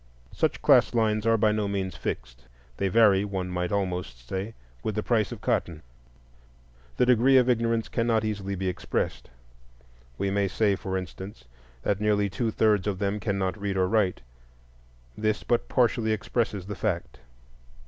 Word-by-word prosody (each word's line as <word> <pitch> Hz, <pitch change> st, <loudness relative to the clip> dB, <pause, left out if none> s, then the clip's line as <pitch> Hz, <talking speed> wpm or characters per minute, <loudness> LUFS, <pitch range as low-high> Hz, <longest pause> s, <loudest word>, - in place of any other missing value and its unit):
Such -, -, -1 dB
class -, -, +5 dB
lines 110 Hz, -1 st, +1 dB
are 115 Hz, 0 st, +4 dB
by 105 Hz, 0 st, +3 dB
no 105 Hz, -1 st, 0 dB
means 95 Hz, -2 st, -2 dB
fixed; -, -, -6 dB, 0.3 s
they 100 Hz, -, 0 dB
vary, 100 Hz, -1 st, +5 dB
one 95 Hz, -3 st, -3 dB
might 90 Hz, 0 st, -2 dB
almost 90 Hz, -11 st, -3 dB
say, 95 Hz, -, -4 dB, 0.3 s
with -, -, -3 dB
the -, -, -1 dB
price -, -, +1 dB
of -, -, -7 dB
cotton. 80 Hz, -3 st, -1 dB, 1.1 s
The -, -, +4 dB
degree 125 Hz, +2 st, +5 dB
of 125 Hz, -1 st, +4 dB
ignorance 115 Hz, -2 st, +1 dB
cannot 115 Hz, -2 st, +1 dB
easily 100 Hz, -2 st, -3 dB
be 95 Hz, 0 st, -3 dB
expressed. 90 Hz, -, -3 dB, 0.9 s
We 100 Hz, -, -1 dB
may 100 Hz, 0 st, +1 dB
say, 100 Hz, +1 st, +1 dB
for 95 Hz, 0 st, -3 dB
instance, 95 Hz, -5 st, -8 dB, 0.4 s
that 100 Hz, 0 st, 0 dB
nearly 105 Hz, -2 st, +2 dB
two 115 Hz, +3 st, -1 dB
thirds 105 Hz, -3 st, +2 dB
of 100 Hz, -2 st, -1 dB
them 100 Hz, +2 st, -1 dB
cannot 100 Hz, -1 st, -2 dB
read 100 Hz, -1 st, -2 dB
or 95 Hz, -1 st, +2 dB
write. 100 Hz, -3 st, +1 dB, 0.9 s
This 110 Hz, 0 st, -1 dB
but 120 Hz, -, 0 dB
partially 115 Hz, -3 st, +2 dB
expresses 105 Hz, -3 st, -2 dB
the 105 Hz, -, -5 dB
fact. 90 Hz, -, -3 dB
100 Hz, 160 wpm, -27 LUFS, 95-110 Hz, 1.1 s, class